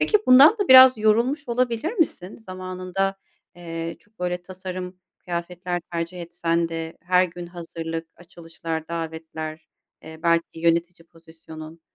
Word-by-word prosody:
peki 425 Hz, -, +3 dB
bundan 265 Hz, +6 st, +9 dB
da 405 Hz, -, -1 dB
biraz 260 Hz, -2 st, +9 dB
yorulmuş 235 Hz, +7 st, +2 dB
olabilir 245 Hz, -, 0 dB
misin? 255 Hz, -, -1 dB
Zamanında, 185 Hz, -1 st, -4 dB, 0.4 s
eee, 165 Hz, -1 st, -6 dB
çok 215 Hz, +1 st, -30 dB
böyle 180 Hz, 0 st, -2 dB
tasarım 185 Hz, 0 st, -7 dB, 0.2 s
kıyafetler 175 Hz, 0 st, -4 dB
tercih 170 Hz, +1 st, -4 dB
etsen 170 Hz, -1 st, -1 dB
de, 165 Hz, 0 st, -6 dB
her 180 Hz, +1 st, +4 dB
gün 175 Hz, 0 st, -7 dB
hazırlık, 165 Hz, -1 st, -6 dB
açılışlar 165 Hz, -2 st, -7 dB
davetler, 160 Hz, -1 st, -6 dB, 0.3 s
eee, 160 Hz, 0 st, -11 dB
belki 170 Hz, -1 st, +3 dB, 0.2 s
yönetici 170 Hz, 0 st, 0 dB
pozisyonun, 160 Hz, -1 st, -13 dB
175 Hz, 125 wpm, -24 LUFS, 165-185 Hz, 0.4 s, bundan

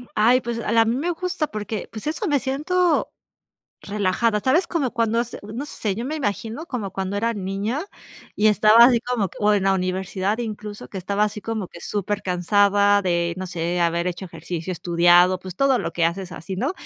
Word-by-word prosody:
Ay, 240 Hz, +4 st, +4 dB
pues, 235 Hz, 0 st, -4 dB
a 220 Hz, -, -3 dB
la 230 Hz, -, +5 dB
a 225 Hz, -, +3 dB
mí 230 Hz, +2 st, 0 dB
me 335 Hz, +6 st, -1 dB
gusta 355 Hz, -2 st, -2 dB
porque, 215 Hz, -1 st, -5 dB
pues, 220 Hz, +6 st, -7 dB
eso 325 Hz, +7 st, -2 dB
me 290 Hz, -3 st, +2 dB
siento 310 Hz, +7 st, 0 dB, 0.7 s
relajada, 210 Hz, +2 st, 0 dB
¿sabes? 315 Hz, -, +2 dB
Como 300 Hz, -8 st, -1 dB
cuando 230 Hz, -1 st, +1 dB
hace 240 Hz, -, -5 dB
no 220 Hz, +7 st, -6 dB
sé, 215 Hz, -8 st, -3 dB
yo 230 Hz, +4 st, -4 dB
me 300 Hz, +4 st, -3 dB
imagino 230 Hz, +3 st, -3 dB
como 225 Hz, -, -4 dB
cuando 195 Hz, +1 st, -3 dB
era 230 Hz, +3 st, 0 dB
niña 205 Hz, -, -3 dB, 0.5 s
y 215 Hz, +1 st, +3 dB
estaba 215 Hz, +2 st, +7 dB
así 240 Hz, -2 st, +5 dB
como 240 Hz, -5 st, -1 dB
que -, -, -14 dB
o 210 Hz, 0 st, +4 dB
en 200 Hz, -2 st, +1 dB
la 195 Hz, 0 st, +3 dB
universidad, 190 Hz, +3 st, -1 dB
incluso, 210 Hz, -3 st, -6 dB
que 195 Hz, -, -6 dB
estaba 200 Hz, +3 st, -1 dB
así 210 Hz, 0 st, -4 dB
como 220 Hz, -4 st, -4 dB
que 170 Hz, -, -13 dB
supercansada 205 Hz, +1 st, +2 dB
de, 170 Hz, -2 st, 0 dB
no 185 Hz, 0 st, -5 dB
sé, 175 Hz, 0 st, -2 dB
haber 170 Hz, 0 st, +1 dB
hecho 180 Hz, +2 st, -5 dB
ejercicio, 170 Hz, +1 st, -5 dB
estudiado, 175 Hz, +1 st, +4 dB
pues, 185 Hz, -1 st, -9 dB
todo 270 Hz, +1 st, +3 dB
lo 165 Hz, -, -3 dB
que 170 Hz, 0 st, 0 dB
haces 175 Hz, +2 st, -2 dB
así, 175 Hz, +5 st, -6 dB
¿no? 265 Hz, -, -1 dB
210 Hz, 205 wpm, -23 LUFS, 185-235 Hz, 0.7 s, estaba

